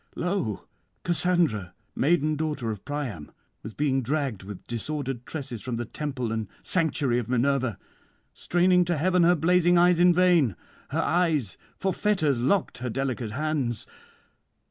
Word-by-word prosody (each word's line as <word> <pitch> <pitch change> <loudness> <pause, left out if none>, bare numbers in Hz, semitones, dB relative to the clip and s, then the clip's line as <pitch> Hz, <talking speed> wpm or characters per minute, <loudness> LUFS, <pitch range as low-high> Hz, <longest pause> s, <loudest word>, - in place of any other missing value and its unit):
'Lo! 175 - -2 0.4
Cassandra, 165 - +1 0.2
maiden 155 +1 +2
daughter 150 -7 -2
of 105 -3 -7
Priam, 130 - -5 0.3
was 110 0 -9
being 135 -2 +1
dragged 135 -5 -2
with 95 -1 -9
disordered 130 +1 -4
tresses 135 -8 -5
from 125 -2 -4
the 120 +1 -3
temple 130 -3 -4
and 110 -2 -2 0.2
sanctuary 150 -8 +1
of 120 -1 -5
Minerva, 130 -2 +1 0.6
straining 180 +1 +3
to 175 -1 0
heaven 180 +4 +2
her 175 +1 +5
blazing 175 +2 +3
eyes 175 0 +5
in 180 0 +6
vain; 175 - +3 0.3
her - - 0
eyes, 160 - +1 0.2
for 190 -1 -1
fetters 155 - +1
locked 155 +7 0
her 125 0 -3
delicate 125 -3 -3
hands. 140 -5 -2
145 Hz, 145 wpm, -26 LUFS, 120-175 Hz, 0.6 s, in